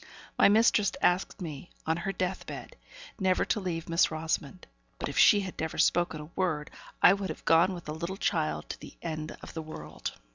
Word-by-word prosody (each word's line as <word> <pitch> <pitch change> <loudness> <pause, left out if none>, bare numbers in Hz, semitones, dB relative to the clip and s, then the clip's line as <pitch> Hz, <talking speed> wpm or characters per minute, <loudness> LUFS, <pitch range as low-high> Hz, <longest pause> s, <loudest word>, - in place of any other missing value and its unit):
My - - +6
mistress 210 -1 +4
had - - +5
asked 180 +2 -1
me, 155 0 -7 0.2
on 160 - +1
her 175 +3 -2
death 185 0 -3
bed, - - -8 0.4
never 185 -2 +2
to 215 - 0
leave 170 -4 -3
Miss 170 +1 +3
Rosamond; 155 - -3 0.3
but - - -3
if - - -6
she 205 - +7
had 185 -2 -7
never 160 0 -3
spoken 175 -2 +2
a 150 +2 -10
word, 160 -6 -1 0.3
I 180 - +9
would 195 -2 -3
have 155 - -7
gone 170 +3 +4
with 175 - -9
the 150 - -4
little 170 +4 -4
child 75 - -1
to - - -5
the - - -12
end 155 -1 -4
of - - -9
the 160 - -4
world. 155 0 -7
170 Hz, 210 wpm, -29 LUFS, 155-190 Hz, 0.4 s, I